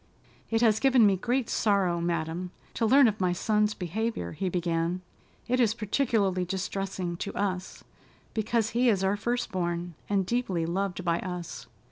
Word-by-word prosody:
"It 225 Hz, 0 st, +1 dB
has 220 Hz, -2 st, +4 dB
given 260 Hz, -3 st, +5 dB
me 200 Hz, -2 st, +5 dB
great 245 Hz, +5 st, 0 dB
sorrow, 190 Hz, -5 st, +1 dB
madam, 170 Hz, +1 st, -2 dB, 0.2 s
to 225 Hz, -, +1 dB
learn 270 Hz, +2 st, +7 dB
of 215 Hz, -2 st, -1 dB
my 180 Hz, -1 st, +2 dB
son's 210 Hz, +3 st, +1 dB
behavior," 190 Hz, -, -3 dB
he 190 Hz, -, -2 dB
began. 170 Hz, 0 st, -1 dB, 0.5 s
"It 250 Hz, +1 st, +1 dB
is 225 Hz, -3 st, +3 dB
particularly 215 Hz, -4 st, +1 dB
distressing 185 Hz, -1 st, -3 dB
to 200 Hz, -, -4 dB
us 190 Hz, -2 st, -3 dB, 0.5 s
because 225 Hz, 0 st, 0 dB
he 245 Hz, +1 st, +3 dB
is 195 Hz, -4 st, +2 dB
our 195 Hz, +1 st, +2 dB
first 240 Hz, +4 st, -2 dB
born, 175 Hz, -1 st, -2 dB, 0.2 s
and 195 Hz, -2 st, +2 dB
deeply 190 Hz, -7 st, 0 dB
loved 185 Hz, +1 st, -2 dB
by 170 Hz, -1 st, +2 dB
us." 180 Hz, -2 st, -6 dB
195 Hz, 160 wpm, -28 LUFS, 180-225 Hz, 0.5 s, learn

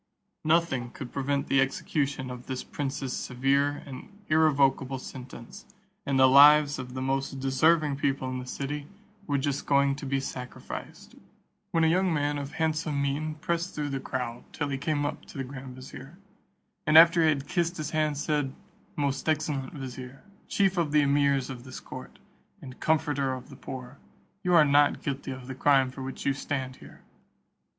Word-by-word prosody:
Nothing 155 Hz, -6 st, +1 dB
could 125 Hz, +1 st, -8 dB
prevent 140 Hz, 0 st, 0 dB
the 135 Hz, 0 st, +3 dB
execution 135 Hz, 0 st, -1 dB
of 125 Hz, 0 st, -9 dB
this 130 Hz, -1 st, -4 dB
prince's 135 Hz, -2 st, -4 dB
severe 140 Hz, +3 st, 0 dB
and 135 Hz, +5 st, -9 dB, 0.2 s
irrevocable 140 Hz, -4 st, +3 dB
sentence, 125 Hz, -2 st, -10 dB, 0.4 s
and 135 Hz, -1 st, +2 dB
the 130 Hz, -, +8 dB
lives 145 Hz, +2 st, +7 dB
of 125 Hz, 0 st, -7 dB
the 130 Hz, -, -3 dB
most 135 Hz, 0 st, -1 dB
deserving 145 Hz, +2 st, +3 dB
people 135 Hz, -2 st, 0 dB
in 130 Hz, 0 st, -3 dB
the 125 Hz, -, -8 dB
city 145 Hz, +2 st, -4 dB, 0.4 s
were 145 Hz, -2 st, +1 dB
just 140 Hz, 0 st, -2 dB
going 140 Hz, -1 st, +3 dB
to 140 Hz, -, -6 dB
be 135 Hz, 0 st, +1 dB
sacrificed, 125 Hz, -2 st, -7 dB, 0.6 s
when 165 Hz, -, +2 dB
a -, -, +5 dB
young 185 Hz, +3 st, +2 dB
man 145 Hz, -1 st, 0 dB
of 140 Hz, +1 st, -6 dB
handsome 155 Hz, -2 st, -1 dB
mien 145 Hz, +3 st, -1 dB
pressed 170 Hz, +3 st, -2 dB
through 150 Hz, -1 st, -2 dB
the 135 Hz, -1 st, -2 dB
crowd 120 Hz, -2 st, -4 dB
till 145 Hz, -2 st, -3 dB
he 135 Hz, -, -1 dB
came 145 Hz, 0 st, 0 dB
up 145 Hz, -, -4 dB
to -, -, -12 dB
the 135 Hz, -, -2 dB
grand 130 Hz, -1 st, -8 dB
vizier, 135 Hz, +4 st, -11 dB, 0.7 s
and 155 Hz, 0 st, +6 dB
after 170 Hz, +1 st, +8 dB
he 160 Hz, -, +5 dB
had 140 Hz, -2 st, -1 dB
kissed 175 Hz, +1 st, 0 dB
his 155 Hz, -2 st, -4 dB
hand, 155 Hz, -2 st, 0 dB
said, 145 Hz, -2 st, -1 dB, 0.4 s
"Most 140 Hz, +1 st, -1 dB
excellent 150 Hz, -3 st, -1 dB
vizier, 130 Hz, -1 st, -8 dB, 0.2 s
chief 195 Hz, -2 st, +2 dB
of 160 Hz, -4 st, 0 dB
the 150 Hz, -, +6 dB
emirs 140 Hz, -2 st, +2 dB
of 120 Hz, -2 st, -8 dB
this 130 Hz, 0 st, -8 dB
court, -, -, -10 dB, 0.4 s
and 130 Hz, -1 st, -11 dB
comforter 150 Hz, -4 st, +1 dB
of 130 Hz, -, -10 dB
the -, -, -10 dB
poor, 130 Hz, +1 st, -8 dB, 0.4 s
you 180 Hz, -1 st, +2 dB
are 160 Hz, -3 st, +7 dB
not 145 Hz, 0 st, +3 dB
guilty 140 Hz, -1 st, -3 dB
of 130 Hz, -1 st, -6 dB
the 130 Hz, -, -6 dB
crime 135 Hz, -1 st, +3 dB
for 135 Hz, -, -9 dB
which 130 Hz, 0 st, -6 dB
you 140 Hz, -, +3 dB
stand 135 Hz, -2 st, -4 dB
here. -, -, -15 dB
140 Hz, 180 wpm, -28 LUFS, 130-150 Hz, 0.7 s, the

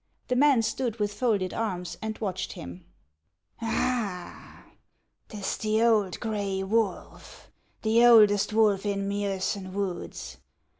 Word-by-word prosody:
The 250 Hz, -, +1 dB
man 270 Hz, -3 st, +4 dB
stood 225 Hz, +1 st, -2 dB
with 205 Hz, -1 st, -1 dB
folded 205 Hz, -5 st, 0 dB
arms, 185 Hz, -6 st, -3 dB
and 220 Hz, 0 st, -4 dB
watched 190 Hz, -4 st, -3 dB
him. 85 Hz, +1 st, -10 dB, 0.4 s
" 95 Hz, -, -36 dB
Ah! 225 Hz, -5 st, -3 dB, 0.7 s
't 215 Hz, -, -8 dB
is 195 Hz, -, -3 dB
the 215 Hz, +1 st, +1 dB
old 210 Hz, -6 st, +2 dB
gray 200 Hz, -4 st, -2 dB
wolf, 210 Hz, 0 st, -3 dB
— -, -, -41 dB
the 225 Hz, +2 st, +4 dB
oldest 215 Hz, -4 st, +6 dB
wolf 210 Hz, -3 st, +3 dB
in 200 Hz, -1 st, -2 dB
Miosen 195 Hz, -1 st, -2 dB
woods! 195 Hz, -3 st, -5 dB
205 Hz, 135 wpm, -27 LUFS, 190-225 Hz, 0.7 s, oldest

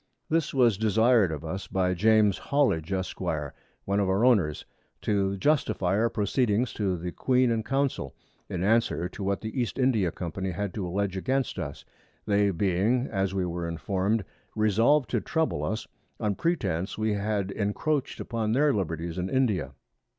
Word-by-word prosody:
This 165 Hz, -1 st, +1 dB
was 120 Hz, -7 st, +3 dB
desir'd 110 Hz, -2 st, +4 dB
of 80 Hz, 0 st, -5 dB
us 95 Hz, +4 st, -5 dB
by 90 Hz, -1 st, +1 dB
James 105 Hz, +1 st, +3 dB
Hollidge, 125 Hz, -, +1 dB
Esq; 95 Hz, -1 st, -3 dB
one 100 Hz, +1 st, -3 dB
of 100 Hz, -2 st, +1 dB
our 100 Hz, +5 st, +2 dB
Owners, 95 Hz, -12 st, +2 dB, 0.4 s
to 100 Hz, -1 st, +1 dB
justifie 105 Hz, -8 st, +1 dB
our 115 Hz, +3 st, +2 dB
Proceedings 110 Hz, +2 st, 0 dB
to 95 Hz, -4 st, -1 dB
the 90 Hz, +1 st, -5 dB
Queen 125 Hz, +2 st, +2 dB
and 115 Hz, -1 st, 0 dB
Council, 135 Hz, -, -1 dB, 0.3 s
in 90 Hz, -1 st, -2 dB
Answer 105 Hz, -5 st, +2 dB
to 100 Hz, -, -7 dB
what 100 Hz, 0 st, -1 dB
the 110 Hz, +4 st, -3 dB
East 120 Hz, -, -3 dB
India 115 Hz, -9 st, +2 dB
Company 95 Hz, +2 st, -4 dB
had 95 Hz, +1 st, -3 dB
to 95 Hz, -4 st, -3 dB
alledge 95 Hz, +1 st, -1 dB
against 130 Hz, +6 st, -1 dB
us, -, -, -6 dB, 0.4 s
they 100 Hz, -1 st, +3 dB
being, 100 Hz, +7 st, +1 dB
as 95 Hz, -2 st, -1 dB
we 95 Hz, -2 st, 0 dB
were 85 Hz, -1 st, -3 dB
inform'd, 95 Hz, +5 st, -1 dB, 0.3 s
resolved 115 Hz, +6 st, +3 dB
to -, -, +1 dB
trouble 160 Hz, -1 st, -1 dB
us, 110 Hz, +1 st, -3 dB, 0.3 s
on 105 Hz, -1 st, 0 dB
Pretence 95 Hz, -, -1 dB
we 110 Hz, 0 st, 0 dB
had 100 Hz, -1 st, -1 dB
encroached 135 Hz, +9 st, -1 dB
upon 110 Hz, -2 st, -2 dB
their 145 Hz, +3 st, +3 dB
Liberties 85 Hz, -3 st, -3 dB
in 90 Hz, +1 st, -2 dB
India. 105 Hz, -, +1 dB
100 Hz, 165 wpm, -27 LUFS, 95-115 Hz, 0.4 s, desir'd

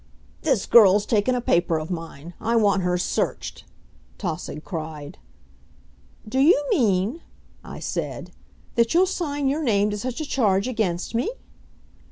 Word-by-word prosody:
"This 265 Hz, -10 st, +1 dB
girl's 205 Hz, -3 st, +6 dB
taken 225 Hz, +3 st, +1 dB
a 245 Hz, -, -1 dB
paper 170 Hz, -6 st, +2 dB
of 155 Hz, +3 st, -5 dB
mine. 165 Hz, -1 st, -7 dB
I 230 Hz, +2 st, 0 dB
want 200 Hz, -4 st, +3 dB
her 180 Hz, 0 st, 0 dB
searched," 180 Hz, -, -3 dB, 0.5 s
Tausig 160 Hz, -4 st, -5 dB
cried. 155 Hz, -4 st, -7 dB, 1.1 s
"Do 260 Hz, +5 st, -1 dB
you 290 Hz, +4 st, +6 dB
mean," 225 Hz, -, +1 dB, 0.4 s
I -, -, -9 dB
said, -, -, -4 dB, 0.4 s
"that 235 Hz, +4 st, +2 dB
you'll 365 Hz, +2 st, +6 dB
sign 290 Hz, -7 st, -2 dB
your 285 Hz, +4 st, 0 dB
name 210 Hz, -6 st, +2 dB
to 205 Hz, -, -3 dB
such 250 Hz, +4 st, -4 dB
a 310 Hz, -, -3 dB
charge 205 Hz, -7 st, +1 dB
against 210 Hz, -8 st, -2 dB
me?" 235 Hz, -, 0 dB
210 Hz, 145 wpm, -24 LUFS, 180-255 Hz, 1.1 s, girl's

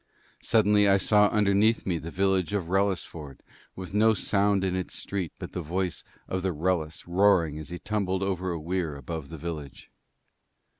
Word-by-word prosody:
Suddenly 105 Hz, -2 st, +4 dB
I 100 Hz, -, +5 dB
saw 105 Hz, +2 st, +4 dB
underneath 105 Hz, +2 st, +2 dB
me 85 Hz, -3 st, -1 dB
the 80 Hz, -, -7 dB
village 95 Hz, +1 st, +1 dB
of 95 Hz, -5 st, -2 dB
Wrellisford, 90 Hz, -7 st, -2 dB, 0.3 s
with 95 Hz, 0 st, -8 dB
no 110 Hz, +2 st, +4 dB
sound 100 Hz, -1 st, +1 dB
in 95 Hz, -1 st, 0 dB
its 95 Hz, -1 st, -4 dB
street 95 Hz, -5 st, -4 dB
but -, -, -7 dB
the 90 Hz, -, -4 dB
voice 90 Hz, +1 st, -3 dB, 0.2 s
of 95 Hz, -, -2 dB
the 95 Hz, -1 st, -1 dB
Wrellis 80 Hz, -1 st, -1 dB
roaring 85 Hz, -4 st, +3 dB
as 80 Hz, -, -8 dB
he 90 Hz, -, -5 dB
tumbled 100 Hz, -1 st, -1 dB
over 95 Hz, -1 st, -2 dB
a 85 Hz, -2 st, -3 dB
weir 85 Hz, -1 st, -2 dB
above 70 Hz, +2 st, -6 dB
the 80 Hz, -, -8 dB
village. 75 Hz, -4 st, -7 dB
95 Hz, 170 wpm, -27 LUFS, 85-100 Hz, 0.3 s, I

